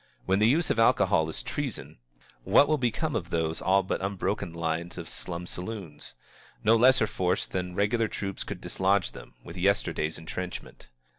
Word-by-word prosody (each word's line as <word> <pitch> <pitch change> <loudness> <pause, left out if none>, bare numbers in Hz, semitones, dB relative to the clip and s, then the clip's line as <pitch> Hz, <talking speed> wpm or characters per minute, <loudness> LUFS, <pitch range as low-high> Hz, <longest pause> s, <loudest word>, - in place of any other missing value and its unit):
When 95 +1 +2
the 105 - +5
use 160 +8 +2
of - - 0
alcohol 80 -7 +4
is - - -3
treason, 135 - -5 0.4
what 140 - +5
will 155 0 +2
become 125 +4 -1
of 90 -6 -2
those 80 -2 -1
all 95 +2 +3
but 95 - -2
unbroken 95 -2 -2
lines 85 +1 -3
of - - -6
slum 90 0 -5
saloons? 90 - -7 0.5
No 110 +2 +5
lesser 125 0 +5
force 90 -3 0
than 90 -1 -4
regular 110 +3 +2
troops 95 -2 -4
could - - -7
dislodge 95 -1 +1
them, - - -12
with 85 - -10
yesterday's 90 -4 0
intrenchment. 90 -2 -7
95 Hz, 165 wpm, -28 LUFS, 85-110 Hz, 0.5 s, the